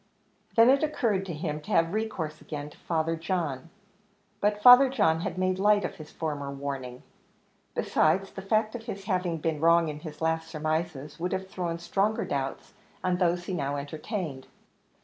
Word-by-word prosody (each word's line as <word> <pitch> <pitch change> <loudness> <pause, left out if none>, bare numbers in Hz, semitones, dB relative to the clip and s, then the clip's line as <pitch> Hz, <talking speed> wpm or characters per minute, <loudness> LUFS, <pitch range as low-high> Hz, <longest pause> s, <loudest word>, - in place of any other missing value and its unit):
Then 230 +2 +7
it 275 - +3
occurred 225 -11 0
to 175 - -4
him 150 0 -3
to 200 - -13
have 165 -4 +2
recourse 185 -8 -3
again 150 -1 -6
to - - -17
Father 165 -1 0
John: 165 -4 -3 0.7
but 210 0 +1
Father 250 +2 +10
John 160 -11 +2
had 175 - -4
made 185 0 0
light 205 0 +4
of - - -5
his 155 -1 -10
former 145 -3 -3
warning. 135 -3 -5 0.7
Besides, 190 +5 +2
the 195 - -7
fact 215 +2 +1
of 235 -2 -7
his 200 -3 -5
having 180 -4 -1
been 160 -1 -2
wrong 165 +1 +4
in 150 0 -6
his 155 -2 -9
last 160 0 0
surmises, 155 -2 -3
would 180 +2 -2
have 190 0 -3
thrown 175 -3 -3
stronger 195 +5 0
doubts 135 -1 -4 0.3
on 180 -1 +1
those 175 -1 +1
he 190 - -4
now 140 -4 -1
entertained. 150 - -5
170 Hz, 175 wpm, -28 LUFS, 150-195 Hz, 0.7 s, Father